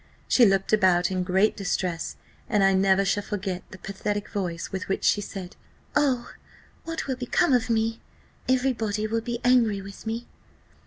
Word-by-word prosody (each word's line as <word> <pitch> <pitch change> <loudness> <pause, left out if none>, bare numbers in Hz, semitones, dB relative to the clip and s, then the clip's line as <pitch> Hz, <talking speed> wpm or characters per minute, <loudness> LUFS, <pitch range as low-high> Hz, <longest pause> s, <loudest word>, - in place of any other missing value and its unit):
She 245 - +6
looked 195 +1 +1
about 185 -3 +4
in 185 -1 0
great 190 +3 +2
distress; 180 -3 -2 0.3
and 205 -2 +3
I 195 0 +5
never 190 +1 +3
shall 205 +2 +1
forget 195 -3 -4
the - - -10
pathetic 205 +2 -4
voice 175 -4 -3
with 190 -1 -4
which 195 - -1
she 205 - +3
said, 195 -2 -7 0.4
'Oh! 265 -5 +1 0.5
what 330 0 -4
will 265 - -2
become 255 +5 +2
of 245 -1 +2
me? 225 0 0 0.5
every 260 +1 +3
body 215 -2 -2
will 225 +1 -1
be 235 +1 -3
angry 235 -5 +4
with 195 +2 -10
me. 230 +2 -3
205 Hz, 170 wpm, -26 LUFS, 190-230 Hz, 0.5 s, She